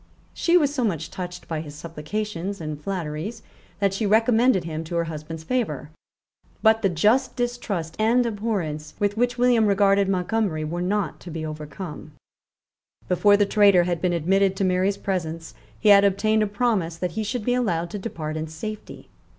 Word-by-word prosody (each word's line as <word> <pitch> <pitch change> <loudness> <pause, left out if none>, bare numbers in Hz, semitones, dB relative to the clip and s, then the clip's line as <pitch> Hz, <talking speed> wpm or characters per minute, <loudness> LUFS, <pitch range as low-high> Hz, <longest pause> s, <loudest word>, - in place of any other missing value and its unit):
She 345 +1 +3
was 290 -4 +2
so 260 -4 -1
much 165 -8 -2
touched 180 -1 -7
by 160 -2 -3
his 150 -2 -9
supplications 175 +5 -4
and 155 -2 -5
flatteries 175 +3 -4 0.4
that 200 -1 +2
she 205 +2 -1
recommended 225 -1 +4
him 160 -1 -4
to 170 +2 -5
her 170 - +2
husband's 160 0 -7
favour; 160 - -2 0.7
but 220 0 +5
the 195 - +3
just 210 +10 +2
distrust 240 -9 -3
and 235 +3 +3
abhorrence 200 -9 -3
with 205 -1 0
which 245 +2 0
William 240 -3 +4
regarded 200 -1 +3
Montgomery 185 -3 0
were 170 +3 -3
not 200 +1 -1
to 175 - -10
be 160 -1 -4
overcome, 155 +1 -7 0.9
Before 205 +3 +4
the 205 - +3
traitor 200 -3 +5
had 175 -2 -2
been 180 - +1
admitted 190 +4 +2
to 195 - -1
Mary's 185 +2 +1
presence, 165 -4 -3 0.3
he 215 - +3
had 200 -1 +8
obtained 215 +2 +2
a 210 - +2
promise 200 -6 0
that 180 0 -2
he 220 +5 -3
should 215 +1 -3
be 245 - +2
allowed 175 -9 0
to 205 - -4
depart 155 -7 -5
in 155 0 -3
safety. 210 +7 -8
195 Hz, 175 wpm, -24 LUFS, 165-215 Hz, 0.9 s, had